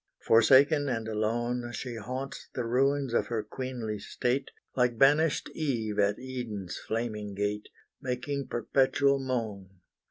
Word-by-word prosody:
Forsaken 140 +5 +5
and 115 -3 -2
alone 120 +3 -1
She 120 +3 -5
haunts 130 +5 -6
the 125 - -1
ruins 135 +2 +1
of - - +2
her 115 -3 -2
queenly 115 -2 -4
state, 125 +6 -1 0.3
Like 125 -2 +2
banished 145 +4 +4
Eve 115 -9 -1
at 100 0 +3
Eden's 120 -8 -5
flaming 105 -3 -3
gate, 105 +1 -2 0.3
Making 130 +2 -3
perpetual 135 +3 +2
moan. 115 -8 -3
120 Hz, 125 wpm, -29 LUFS, 110-135 Hz, 0.3 s, Forsaken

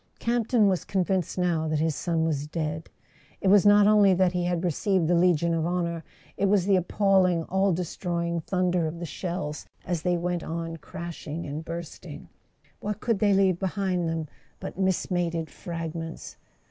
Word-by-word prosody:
Campton 235 -2 +2
was 185 -3 +1
convinced 190 -2 -1
now 170 -3 +1
that 155 0 0
his 160 +1 +1
son 165 +1 0
was 150 -2 -1
dead. 155 0 -4 0.5
It 190 - +1
was 205 0 +6
not 205 0 +7
only 205 -2 +5
that 185 0 +3
he 180 -1 -1
had 175 -1 -1
received 180 +1 +1
the 175 - +3
Legion 170 -1 +3
of 165 -1 0
Honour; 170 -2 -2 0.3
it 200 - +2
was 195 -2 +3
the 200 -1 +4
appalling 185 -2 +2
all 190 +3 +1
destroying 170 -1 -2
thunder 180 -1 0
of 160 +2 -5
the 170 - -5
shells 170 -3 -5 0.2
as 175 -3 -2
they 180 0 +1
went 175 0 -2
on 165 0 -4
crashing 170 -1 -7
and 150 +2 -5
bursting. 165 0 -8 0.5
What 210 +1 -4
could 230 -4 0
they 205 -1 +3
leave 190 -3 +3
behind 190 -3 -1
them 165 -1 -2 0.3
but - - -7
mismated 175 -3 -1
fragments? 165 -1 -6
175 Hz, 170 wpm, -26 LUFS, 165-190 Hz, 0.5 s, not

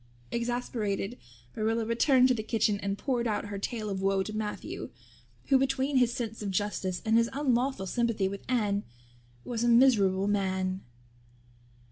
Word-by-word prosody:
Exasperated, 235 -3 -2 0.4
Marilla 225 +1 0
returned 250 +3 +4
to 255 - +3
the 225 - -2
kitchen 215 -2 +1
and 200 0 -2
poured 245 -2 -1
out 210 -1 -1
her 200 -1 -4
tale 215 +1 -3
of 195 -2 -3
woe 195 0 +2
to 215 - -6
Matthew, 215 -1 -4 0.6
who, 270 -1 +5
between 270 +1 +1
his 245 -2 +4
sense 225 -2 -4
of 205 - -3
justice 190 -2 -2
and 220 0 +3
his 230 0 +3
unlawful 265 -5 0
sympathy 225 -1 0
with 195 +1 -5
Anne, 210 -5 +1 0.6
was 235 -1 -2
a - - +2
miserable 210 -6 +4
man. 190 -2 0
220 Hz, 155 wpm, -29 LUFS, 200-245 Hz, 0.6 s, who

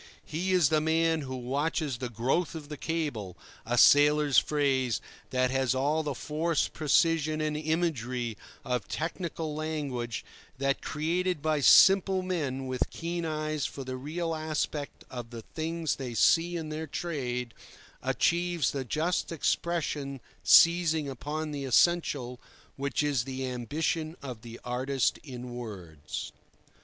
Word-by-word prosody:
He 180 +5 -2
is 180 -6 +4
the 155 -1 +3
man 160 0 +2
who 130 -2 -5
watches 140 +2 -1
the 125 -1 -3
growth 130 +10 0
of 150 -2 -8
the 150 - -5
cable—a 120 - -4
sailor's 145 -1 +6
phrase 135 -5 +1 0.3
which 130 -1 +1
has 130 -1 +1
all 145 +4 +1
the 145 -3 -3
force, 155 +4 0
precision, 155 +1 +2
and 155 -1 -1
imagery 140 -7 -1 0.3
of 125 -3 -1
technical 165 -1 -3
language 145 -6 -3 0.3
that, 140 +1 0
created 175 +3 -1
by 155 0 +1
simple 190 +4 +6
men 145 -8 -2
with 130 -1 -1
keen 170 0 -4
eyes 155 -1 -1
for 135 - -7
the 130 0 -5
real 165 +6 -3
aspect 155 -2 -3
of 120 -2 -6
the 115 -1 -8
things 160 +2 -2
they 125 -4 -5
see 165 - +4
in 160 -2 -5
their 155 +1 -4
trade, 125 -7 -3 0.5
achieves 170 -3 +1
the 135 -2 -3
just 160 +9 -1
expression 150 -4 -1 0.2
seizing 165 -3 +6
upon 150 +4 -4
the 145 -1 -4
essential, 135 -3 +2 0.4
which 140 +2 -1
is 140 -5 +1
the 130 0 -4
ambition 155 +6 -2
of 125 -5 -6
the 115 0 -10
artist 130 +2 0
in 125 -3 -8
words. 90 -11 -7
150 Hz, 135 wpm, -29 LUFS, 130-160 Hz, 0.5 s, sailor's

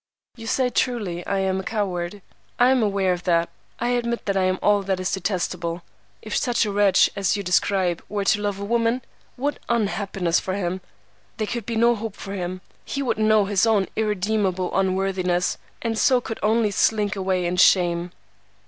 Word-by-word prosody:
"'You 225 -2 -9
say 250 +1 +1
truly 210 -9 -1
I 200 - 0
am 190 0 0
a - - -4
coward. 195 -2 -3 0.3
I 245 +1 +5
am 260 -2 +3
aware 195 -3 +1
of 175 - -5
that. 170 -1 +2 0.3
I 240 - 0
admit 235 -1 -1
that 200 - 0
I 190 -1 +2
am 185 0 +1
all 205 -1 +3
that 190 -1 -1
is 185 - -2
detestable. 180 -3 -2 0.4
If 215 - -4
such 240 -2 +1
a 210 - -2
wretch 200 -1 +4
as 200 +1 +1
you 200 - -4
describe 180 -1 +1
were 205 -1 -2
to 205 - +2
love 205 -1 -2
a 200 - -4
woman, 235 +3 +1 0.3
what 285 +2 -2
unhappiness 195 -5 0
for 185 - -3
him! 185 -1 -2 0.6
There 215 - -1
could 230 0 -4
be 230 - -2
no 235 +1 +4
hope 220 -2 -5
for 195 - -7
him. 185 -1 -4 0.2
He 275 - -3
would 250 - -1
know 215 -1 +4
his 200 +2 +2
own 210 -4 +3
irredeemable 205 -3 0
unworthiness, 185 -2 0 0.2
and 230 -1 -1
so 255 -2 +4
could 225 -2 -6
only 215 0 +2
slink 205 +1 +1
away 190 -2 0
in 175 +1 -1
shame. 175 -1 +4
200 Hz, 190 wpm, -23 LUFS, 185-220 Hz, 0.6 s, I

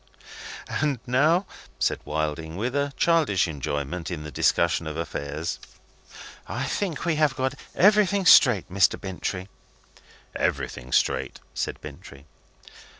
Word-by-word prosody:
"And 145 -4 -1
now," 155 +9 +3 0.3
said - - 0
Wilding, 80 +2 -3
with 120 +6 -2
a 140 0 0
childish 155 - +3
enjoyment 75 +2 -4
in 85 -4 -5
the 75 - -7
discussion 85 +1 +1
of 75 0 -5
affairs, 75 0 -4 0.9
"I - - -3
think 180 -8 -2
we 165 -3 +1
have 150 -3 +2
got 130 -1 -1 0.2
everything 200 -1 +4
straight, 125 - +7
Mr. 95 +1 +2
Bintrey." 95 -1 -4 0.9
"Everything 65 0 -2
straight," - - +1
said - - -3
Bintrey. 70 0 -11
95 Hz, 120 wpm, -25 LUFS, -, 0.9 s, straight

